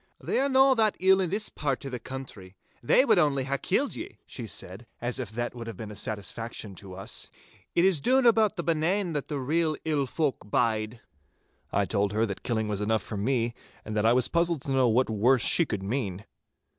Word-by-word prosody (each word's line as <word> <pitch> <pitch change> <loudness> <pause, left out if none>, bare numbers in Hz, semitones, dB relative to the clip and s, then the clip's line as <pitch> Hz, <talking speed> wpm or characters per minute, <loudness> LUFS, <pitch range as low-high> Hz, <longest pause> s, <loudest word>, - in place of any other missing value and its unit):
'They - - -1
are 275 +1 +2
no 265 0 +6
that 220 -4 +2
ill 190 +1 +5
in 180 - -1
this 210 +4 0
pairt 140 -2 -3
o' - - -4
the 125 -2 -5
country. 115 -9 -9 0.3
They 255 - +4
wad 220 -8 +4
only 140 -4 +2
hae 140 +1 -2
killed - - 0
ye,' - - -8
she - - -7
said, 100 +6 -7
as 120 +1 -3
if - - -4
that 120 +3 -3
would 120 -2 -8
have 115 - -7
been 110 -2 -7
a - - -9
satisfaction 105 +1 -5
to 95 -2 -10
us. 95 - -6 0.5
'It 170 - +4
is 185 -7 +3
doon 260 - +3
aboot 220 -3 +4
the 170 - -3
Benane 170 +3 0
that 145 -2 -3
the 145 -2 -3
real 155 +3 0
ill 145 -4 0
folk 135 -8 -2
bide.' 110 0 0 0.7
I 100 - +1
told 100 +1 0
her 110 +2 +2
that 100 -4 -5
killing 110 -3 -1
was 105 -1 -2
enough 110 0 0
for - - -6
me, 120 +2 0 0.3
and 110 - -5
that 105 +1 +2
I 115 - +5
was 125 +1 +3
puzzled 170 -3 0
to 135 - -4
know 130 -2 +3
what 120 +3 +3
worse 115 +4 +3
she 170 - +5
could 105 -5 -3
mean. 100 -3 -3
125 Hz, 220 wpm, -27 LUFS, 110-165 Hz, 0.7 s, no